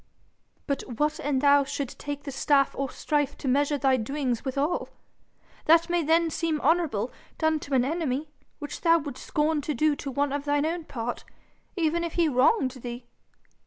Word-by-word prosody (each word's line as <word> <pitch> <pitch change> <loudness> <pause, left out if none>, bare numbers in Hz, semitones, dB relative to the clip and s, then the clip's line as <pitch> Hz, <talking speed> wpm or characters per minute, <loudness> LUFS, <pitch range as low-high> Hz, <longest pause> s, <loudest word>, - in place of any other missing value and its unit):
'But 280 -2 -1 0.2
what 300 +2 0
an' 290 -2 0
thou 285 +1 +5
should 275 -1 -4
take 285 0 -6
the 280 - -5
staff 275 +1 +2
of 275 -1 -2
strife 290 -2 -1
to - - -6
measure 285 +3 +2
thy 265 -1 +3
doings 250 0 -2
withal? 280 +5 -1 0.8
That 335 +2 +5
may 350 0 +2
then 325 +1 +2
seem 320 -1 -1
honourable, 290 -9 +1 0.3
done 315 -1 +1
to 280 -2 -3
an 250 -1 +3
enemy, 295 -1 -2 0.3
which 290 -1 -7
thou 335 -1 +5
would 285 -4 -6
scorn 300 0 0
to 300 +1 -3
do 305 +3 +2
to 280 - -5
one 280 +1 0
of 285 0 -3
thine 290 0 +1
own 330 0 -2
part, 240 -3 -4 0.5
even 340 -1 +1
if 335 - -3
he 340 -2 +3
wronged 265 - +3
thee.' 240 0 -6
290 Hz, 180 wpm, -27 LUFS, 270-315 Hz, 0.8 s, thou